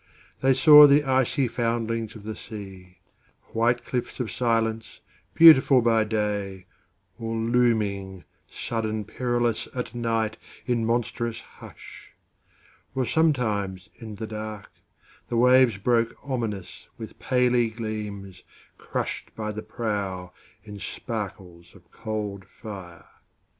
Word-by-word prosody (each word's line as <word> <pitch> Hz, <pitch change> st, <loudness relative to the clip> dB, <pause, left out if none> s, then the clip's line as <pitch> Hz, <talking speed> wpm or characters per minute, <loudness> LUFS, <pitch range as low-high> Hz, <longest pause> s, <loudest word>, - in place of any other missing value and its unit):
They 135 Hz, 0 st, +3 dB
saw 150 Hz, +1 st, +9 dB
the 145 Hz, +1 st, +5 dB
icy 130 Hz, 0 st, +1 dB
foundlings 115 Hz, -1 st, -2 dB
of 110 Hz, -, -11 dB
the 110 Hz, 0 st, -5 dB
sea, 95 Hz, -4 st, -10 dB, 0.5 s
White 120 Hz, +1 st, +1 dB
cliffs 125 Hz, +1 st, -4 dB
of 120 Hz, -3 st, -3 dB
silence, 115 Hz, -2 st, -1 dB, 0.4 s
beautiful 155 Hz, -5 st, +8 dB
by 115 Hz, -2 st, +3 dB
day, 105 Hz, -3 st, -2 dB, 0.5 s
Or 115 Hz, 0 st, -3 dB
looming, 110 Hz, -5 st, 0 dB, 0.3 s
sudden 110 Hz, -2 st, -3 dB
perilous, 120 Hz, 0 st, -1 dB
at 125 Hz, -2 st, -4 dB
nightIn 115 Hz, 0 st, -2 dB
monstrous 115 Hz, 0 st, -2 dB
hush; -, -, -14 dB, 0.8 s
or 130 Hz, -1 st, 0 dB
sometimes 110 Hz, -, 0 dB
in 110 Hz, -3 st, -9 dB
the 110 Hz, +2 st, -5 dB
darkThe 110 Hz, +2 st, -8 dB
waves 125 Hz, -2 st, +5 dB
broke 115 Hz, +2 st, +1 dB
ominous 115 Hz, -9 st, -5 dB
with 110 Hz, -, -10 dB
paly 125 Hz, -2 st, +2 dB
gleamsCrushed 105 Hz, -4 st, -6 dB
by 105 Hz, -1 st, -3 dB
the 105 Hz, +1 st, -6 dB
prow 100 Hz, -5 st, -4 dB, 0.3 s
in 105 Hz, -2 st, -10 dB
sparkles 95 Hz, -7 st, -7 dB
of 85 Hz, -3 st, -20 dB
cold 105 Hz, -3 st, -5 dB
fire. 95 Hz, -5 st, -10 dB
110 Hz, 105 wpm, -25 LUFS, 105-120 Hz, 0.8 s, saw